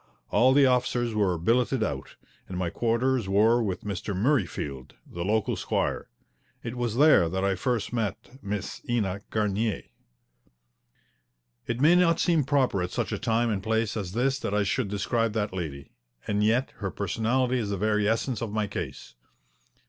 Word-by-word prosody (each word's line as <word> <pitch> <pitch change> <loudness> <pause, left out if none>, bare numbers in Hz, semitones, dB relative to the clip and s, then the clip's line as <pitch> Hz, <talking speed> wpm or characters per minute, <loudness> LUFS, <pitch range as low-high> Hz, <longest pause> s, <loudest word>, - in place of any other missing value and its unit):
All 120 +5 +5
the 140 +1 +5
officers 125 -2 +1
were 100 -5 +1
billeted 120 +7 +1
out, 70 -9 -4 0.3
and 90 - -5
my 90 -2 -1
quarters 120 +1 0
were 110 +5 +4
with 95 -5 -3
Mr. 100 0 -4
Murreyfield, 95 - -1
the 85 - -6
local 110 +3 0
squire. - - -2 0.6
It 115 +1 -5
was 120 -3 -2
there 140 - +5
that 95 +2 -2
I 100 - +2
first 120 +5 -2
met 115 +3 -4
Miss 100 -1 -4
Ena 100 -5 0
Garnier. 105 0 -1 1.8
It 120 0 -2
may 155 +4 +6
not 175 -2 +4
seem 165 -6 +2
proper 130 -8 +1
at 90 - -2
such - - -2
a - - -2
time 115 +1 +1
and 100 -2 -1
place 110 0 0
as 95 -4 -4
this 135 +4 +1
that 100 - -2
I 105 - +2
should 100 +4 0
describe 105 +3 -1
that 105 -3 -2
lady. 75 -7 -6 0.3
And 105 0 0
yet 115 +5 +2
her 100 - -3
personality 115 +7 0
is 105 -3 -2
the 100 - -2
very 105 +1 +1
essence 115 +1 -1
of 115 - -2
my 110 0 0
case. 90 - -6
110 Hz, 170 wpm, -27 LUFS, 100-120 Hz, 1.8 s, may